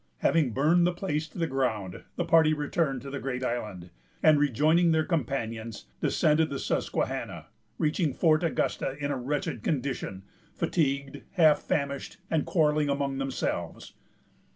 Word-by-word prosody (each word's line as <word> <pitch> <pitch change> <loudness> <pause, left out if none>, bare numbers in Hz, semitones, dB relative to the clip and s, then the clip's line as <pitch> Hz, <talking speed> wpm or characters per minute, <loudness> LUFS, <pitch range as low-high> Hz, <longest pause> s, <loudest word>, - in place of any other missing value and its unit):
Having 150 -8 +2
burned 165 +7 +4
the 180 - 0
place 160 -4 -2
to 160 - -14
the 170 - +1
ground, 110 - -2
the 175 - -1
party 160 -2 +5
returned 145 -3 -1
to 140 - -7
the 140 - -4
Great 130 -1 -3
Island; 105 -8 -4 0.3
and, 155 -2 +6
rejoining 155 +5 +3
their 160 0 +2
companions, 115 - -3 0.2
descended 155 +1 +2
the 140 - -3
Susquehanna, - - -2 0.3
reaching 155 0 +1
Fort 155 +3 +3
Augusta 150 -4 -1
in 145 0 -2
a - - 0
wretched 130 -2 -2
condition, 130 -9 -2 0.3
fatigued, 140 -4 -1
half 160 -5 +5
famished, 140 -2 -2
and 160 -2 +1
quarrelling 150 -3 +2
among 140 -1 -1
themselves. 135 -1 -3
145 Hz, 145 wpm, -28 LUFS, 130-160 Hz, 0.3 s, and